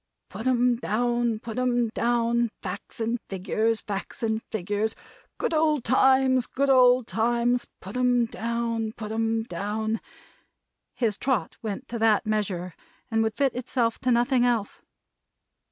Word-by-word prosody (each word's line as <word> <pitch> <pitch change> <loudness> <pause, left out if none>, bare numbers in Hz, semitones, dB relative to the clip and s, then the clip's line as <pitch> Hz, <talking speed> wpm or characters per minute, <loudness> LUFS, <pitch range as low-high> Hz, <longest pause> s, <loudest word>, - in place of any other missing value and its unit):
"Put 230 - -5
'em 245 -1 +3
down. 240 0 0
Put 225 +2 -6
'em 245 -2 +1
down! 235 +1 +1
Facts 195 +5 -6
and 230 +1 -1
Figures, 215 +4 0
Facts 200 +2 -5
and 220 0 0
Figures! 210 +2 -2 0.4
Good - - -1
old 305 -4 +2
Times, 260 0 +4
Good 275 +1 +1
old 250 -1 +6
Times! 240 +2 +1
Put 195 +4 -9
'em 250 -1 +3
down, 230 -1 -2
Put 215 -2 -7
'em 225 0 0
down!" 215 +3 -3 0.9
his 220 -5 0
trot 245 -11 0
went 220 +4 -5
to 235 - -4
that 220 -1 +3
measure, 195 -5 -2 0.4
and 225 0 +2
would 220 -1 0
fit 270 +1 +1
itself 240 -2 -1
to 255 - +1
nothing 245 +1 +3
else. 235 -4 0
230 Hz, 140 wpm, -26 LUFS, 220-245 Hz, 0.9 s, old